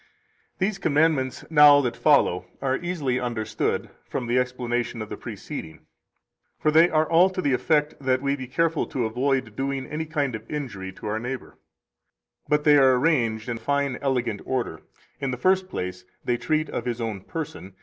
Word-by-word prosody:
200 190 - +1
These 210 - -6
commandments 145 -5 +1
now 150 -2 +8
[that 120 -3 -2
follow] 115 - +3
are 135 -1 0
easily 150 -8 -1
understood 115 -3 -2 0.2
from 125 - -3
[the 120 +2 +2
explanation 125 -1 -2
of] 110 - -5
the - - -4
preceding; 80 - -8 0.7
for 155 - +2
they 165 +3 +6
are 155 0 +2
all 175 +3 +5
to 190 0 -6
the 145 -7 +1
effect 150 +3 +2
that 130 -1 +2
we 140 +1 0
[be 130 -2 -7
careful 165 +4 0
to] 125 -3 -2
avoid 125 0 -1
doing 135 +1 -2
any 155 +3 -4
kind 145 -5 -1
of 110 0 -7
injury 120 -11 -5
to - - -12
our 105 +1 -1
neighbor. 125 +3 -6 0.9
But 150 0 +2
they 150 -1 +6
are 130 -1 +6
arranged 120 -7 +1
in 120 -1 -3
fine 140 +2 -1
[elegant] 125 -6 -1
order. 120 -11 -3 0.4
In 140 -2 -2
the 125 - -3
first 185 +5 +2
place, 90 - -5 0.2
they 120 - +1
treat 155 +4 0
of - - -3
his 120 -1 -2
own 110 -4 -3
person. 150 - -7
130 Hz, 180 wpm, -25 LUFS, 120-150 Hz, 0.9 s, now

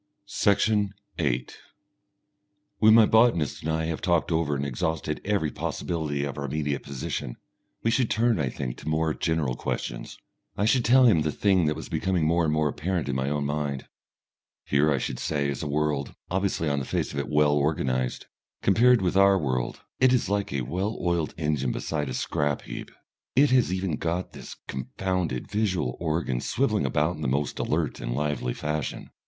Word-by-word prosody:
Section 100 0 +2 0.2
8 60 +1 -1 1.2
When 110 +1 +7
my 115 -1 +8
botanist 110 -10 +3
and 80 - -2
I 80 0 0
have 80 -1 -3
talked 85 -1 +1
over 80 -3 +1
and 70 0 -2
exhausted 75 +3 -2
every 100 -7 0
possibility 75 -5 -2
of 70 0 -4
our 70 - -3
immediate 70 0 -2
position, 65 -3 -5 0.5
we 115 - +2
should 120 -1 +2
turn, 115 -3 +2
I 70 -3 0
think, 65 -1 -5
to - - -6
more 80 0 +1
general 80 -7 0
questions. - - -4 0.4
I 105 - +1
should 120 +2 +3
tell 130 +3 +6
him 95 -10 +5
the 75 0 0
thing 95 -3 +2
that 75 - +1
was 80 - -7
becoming 90 -4 0
more 85 +1 +2
and 75 - +1
more 75 0 +2
apparent 85 +1 -2
in 70 - -1
my 65 +1 0
own 75 -1 -1
mind. 70 -2 -2 0.8
Here, 70 +2 +3
I 70 - +2
should 60 0 -3
say, 70 -2 -1
is 70 -2 -3
a - - -3
world, 75 -1 -1 0.2
obviously 95 -3 0
on 70 -1 +1
the 65 - -4
face - - -2
of 70 - -2
it 70 - -3
well 75 -1 +4
organised. 65 -4 0 0.4
Compared 120 +2 +5
with 90 0 0
our 100 0 +6
world, 65 -7 -2 0.2
it 130 -1 +5
is 125 -5 +2
like 100 0 -1
a 70 -1 -1
well 95 - -2
oiled 85 -3 -1
engine 75 -6 0
beside 75 0 -2
a 65 - -3
scrap 75 +1 -1
heap. - - -7 0.5
It 140 +2 +5
has 125 -6 +4
even 95 -4 -1
got 85 +2 -2
this - - -9
confounded 85 +1 -2
visual 95 - 0
organ 80 -6 -1
swivelling - - 0
about 75 +3 0
in - - -9
the 75 - -1
most 70 +3 -1
alert 80 -1 -1
and - - -3
lively 75 -4 -1
fashion. 75 0 -3
75 Hz, 185 wpm, -26 LUFS, 70-95 Hz, 1.2 s, my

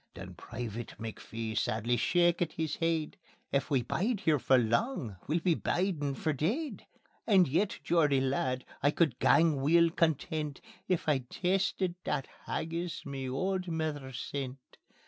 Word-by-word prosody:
Then 90 +1 -8
Private 115 +4 -6
McPhee 115 0 -5
sadly 115 +4 +1
shakit 175 +6 +2
his 160 -2 -2
heid: 165 +2 -1 0.3
"If 140 - 0
we 135 -4 +2
bide 205 - -1
here 155 -6 +3
for 130 +1 +4
lang, 120 - 0
we'll 160 +3 +1
be 175 0 +3
bidin' 160 -5 -1
for 155 +2 -1
deid. 225 - -2 0.4
And 190 -6 +6
yet, 175 +9 +1
Geordie 150 -5 +3
lad, 130 -1 0 0.2
I 145 - +4
could 150 -5 +1
gang 160 -3 +4
weel 165 +4 +5
content 155 -2 0 0.3
If 180 -4 0
I'd 130 -5 +1
tasted 190 0 0
that 140 -3 -1 0.2
haggis 170 +2 -3
ma 135 -2 -4
auld 185 +7 -1
mither 155 -5 -3
sent." 130 +1 -6
150 Hz, 145 wpm, -31 LUFS, 130-170 Hz, 0.4 s, And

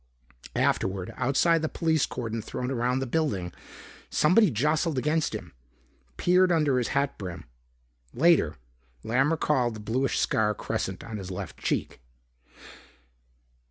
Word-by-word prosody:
Afterward, 95 -1 0
outside 145 +6 +2
the 155 - -1
police 160 -3 +1
cordon 115 -2 -4
thrown 125 +4 -4
around 125 +1 0
the - - -1
building, 120 - -1 0.6
somebody 185 +6 +4
jostled 150 +5 0
against 150 +4 0
him, - - -8 0.6
peered 180 +1 +4
under 150 -6 +3
his 120 - -1
hat 140 0 0
brim. 90 -4 -6 0.7
Later, 145 - +3 0.5
Lamb 130 +5 +2
recalled 135 -7 +1
the - - -8
bluish 120 +5 -1
scar 105 -1 +1
crescent 95 0 -3
on 110 -2 -6
his 95 -2 -7
left 90 - -6
cheek. - - -2
130 Hz, 125 wpm, -27 LUFS, 110-155 Hz, 0.7 s, somebody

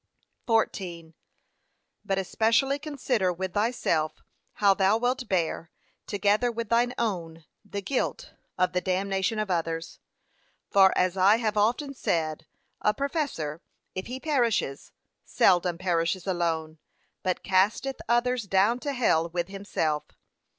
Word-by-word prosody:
14. 175 -8 -1 0.9
But 195 -2 -1
especially 230 +8 +2
consider 260 - 0
with 185 +1 -4
thyself 205 -8 0 0.3
how 200 -2 +4
thou 195 +2 +3
wilt 245 0 -1
bear, 170 -2 -1 0.4
together 205 +4 +2
with 230 -2 -4
thine 240 +2 +2
own, 165 -8 -3 0.2
the 200 -1 -6
guilt, 260 +6 -2 0.2
of 180 0 +1
the 180 - +1
damnation 195 +3 0
of 215 -3 -1
others. 165 -1 -2 0.7
For 195 -1 +6
as 185 +1 +1
I 195 +3 +6
have 225 -2 -1
often 240 +7 +1
said, 160 - -2 0.3
a 210 - +2
professor, 275 - -2 0.3
if 185 - -5
he 255 +2 -5
perishes, 240 - 0 0.3
seldom 175 -2 +3
perishes 175 0 0
alone, 165 -4 -1 0.4
but 185 -2 -1
casteth 205 +8 +1
others 240 -1 +2
down 200 +5 +2
to 285 +2 -3
hell 170 -10 +2
with 175 +1 -3
himself. 180 -6 -2
195 Hz, 125 wpm, -27 LUFS, 175-235 Hz, 0.9 s, For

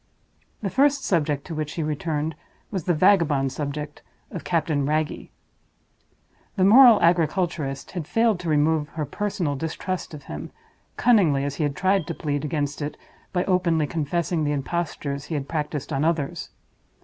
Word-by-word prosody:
The 195 - -1
first 280 0 +3
subject 150 -5 0
to 170 - -6
which 155 -1 -3
she 165 - -2
returned 155 0 -2 0.4
was 190 -6 -3
the 175 - +2
vagabond 155 -7 +3
subject 150 +1 -5 0.3
of 170 - -6
Captain 155 -2 0
Wragge. 155 0 -1 1.3
The 190 - +2
"moral 235 +3 +8
agriculturist" 165 -4 +1
had 170 -5 -5
failed 225 -4 +2
to 175 -2 -4
remove 150 0 +2
her 155 - -1
personal 175 -2 -2
distrust 160 +3 -4
of 145 - -11
him, 75 - -7 0.5
cunningly 180 - +4
as 140 0 -3
he - - 0
had 140 -1 -2
tried 190 -3 +1
to - - -4
plead 145 -1 -2
against 145 -1 -2
it 145 +1 -4 0.3
by 180 -1 0
openly 175 -4 +2
confessing 165 +2 -1
the 145 0 0
impostures 145 -1 -3
that - - -14
he - - -5
had 140 -2 -3
practiced 150 -2 -3
on 135 - 0
others. 155 -4 -1
155 Hz, 160 wpm, -24 LUFS, 145-180 Hz, 1.3 s, moral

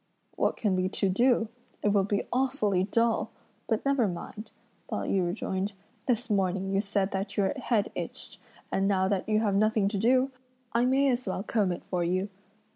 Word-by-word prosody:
"What - - +1
can 205 -4 +1
we 185 0 +1
two 195 - 0
do? 235 +3 +3 0.4
it 210 - +3
will 200 -1 +3
be 205 0 0
awfully 245 -8 +1
dull! 230 +2 +1 0.4
but 220 +1 0
never 275 -5 +3
mind," 200 +4 -6 0.4
Pao - - -2
yü 185 -3 +1
rejoined; 190 +2 -2 0.3
"this 245 -1 +1
morning 195 -2 0
you 195 - +3
said 200 -1 0
that 195 +1 -3
your 195 -2 +2
head 235 -6 0
itched, - - -6 0.3
and 195 0 +1
now 190 -1 +2
that 195 +1 -1
you 215 0 +3
have 205 -3 +1
nothing 215 0 +3
to 200 -1 -2
do, 255 +5 +3 0.4
I 235 +1 +3
may 270 +2 +3
as 245 -1 -2
well 185 +1 -2
comb 210 -4 +1
it 175 - -5
for 180 -2 -1
you." 185 +3 0
205 Hz, 190 wpm, -28 LUFS, 190-230 Hz, 0.4 s, do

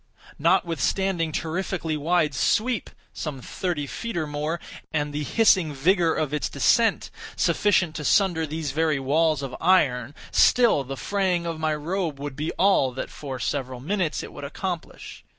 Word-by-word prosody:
Notwithstanding 170 +1 +1
its 155 - -2
terrifically 165 -1 -2
wide 155 0 +1
sweep 225 - +1 0.2
(some 150 -4 -5
thirty 155 +3 -3
feet 230 +6 -5
or 160 - 0
more) 150 +3 -3 0.3
and 150 -1 -1
the 150 - -2
hissing 185 - +3
vigor 170 +3 +2
of 150 -2 -1
its 150 - -1
descent, 225 - +2 0.2
sufficient 180 -6 +2
to 150 - -5
sunder 170 -1 +2
these 155 -1 -3
very 155 0 +1
walls 150 +2 +1
of 135 -2 -5
iron, 145 -7 +2 0.2
still 235 - +4
the 135 +1 -6
fraying 185 -4 0
of 165 -2 -4
my 155 -1 0
robe 160 -1 -3
would 145 -1 -5
be 150 +3 -2
all 190 -9 +3
that, 130 - -5
for 135 -3 -6
several 130 0 -3
minutes, 175 +3 -1
it - - -9
would - - -9
accomplish. 170 +4 -6
160 Hz, 160 wpm, -25 LUFS, 145-180 Hz, 0.3 s, still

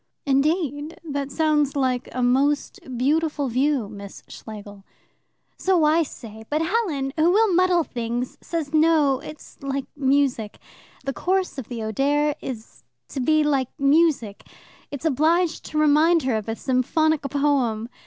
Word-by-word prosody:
"Indeed! 290 +2 0
That 285 -3 -4
sounds 300 -2 +1
like 255 -2 0
a 255 - -2
most 275 +4 +1 0.2
beautiful 295 +1 0
view, 260 -1 +1
Miss 200 -1 -10
Schlegel." 205 -2 -10 0.8
"So 370 -4 +2
I 310 +2 +4
say, 220 -7 -8
but 305 +2 0
Helen, 325 -9 -1
who 320 +2 +4
will 415 +1 +3
muddle 360 -1 +3
things, 240 -1 -4
says 320 -3 -4
no, 305 -4 +3
it's 300 +2 -12
like 275 -1 -3
music. 270 -6 0 0.5
The 275 - -2
course 370 -3 -1
of 255 - -7
the 235 -3 -5
Oder 285 +7 +1
is 230 -4 -8 0.3
to - - -5
be 310 +4 +3
like 275 -4 +1
music. 280 -7 +2 0.5
It's 285 +2 -7
obliged 325 +3 +1
to 305 - -5
remind 305 +2 +4
her 255 -3 0
of 220 0 -3
a 225 - -2
symphonic 290 +5 +1
poem. 275 -6 0
285 Hz, 145 wpm, -23 LUFS, 255-315 Hz, 0.8 s, I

